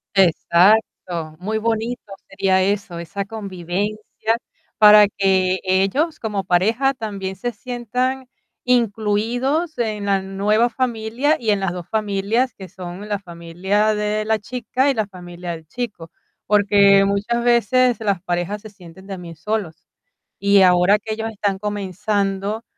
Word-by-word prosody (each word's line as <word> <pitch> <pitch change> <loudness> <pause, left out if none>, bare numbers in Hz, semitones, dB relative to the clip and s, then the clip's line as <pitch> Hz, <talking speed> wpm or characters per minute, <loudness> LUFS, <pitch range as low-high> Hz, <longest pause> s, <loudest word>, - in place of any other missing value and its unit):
Exacto. 175 -2 +2
Muy 215 +4 -2
bonito 225 -1 -2 0.2
sería 190 -1 +2
eso, 195 -3 -1
esa 195 +4 -5
convivencia, 205 +2 -3 0.4
para 210 -1 +8
que 190 -2 +1
ellos, 195 - +1
como 210 -3 -2
pareja, 220 +10 +2
también 200 -5 -5
se 240 +6 -3
sientan 250 +3 -3 0.4
incluidos 245 - 0
en 215 -3 -2
la 195 -1 +2
nueva 205 +5 +1
familia 240 +4 0
y 225 -3 -2
en 205 -1 +3
las 195 -2 -1
2 175 -2 -7
familias, 215 +3 0
que 190 -3 -11
son 185 +2 -8
la 205 - 0
familia 185 +4 -1
de 210 0 -1
la 220 0 +2
chica 250 +4 -1
y - - +3
la 215 -4 -1
familia 175 -2 -8
del 160 -2 -8
chico, 215 -7 -6 0.3
porque 200 -1 +5
muchas 205 +4 0
veces 245 +1 +3
las 200 -5 -1
parejas 175 +4 -2
se 215 - -10
sienten 190 -1 -15
también 180 -4 -8
solos. 180 -2 -4 0.5
Y 200 0 +4
ahora 180 +2 +5
que 220 +1 -5
ellos 225 +1 -3
están 200 -2 -2
comenzando 205 +1 -2
205 Hz, 135 wpm, -20 LUFS, 190-225 Hz, 0.5 s, para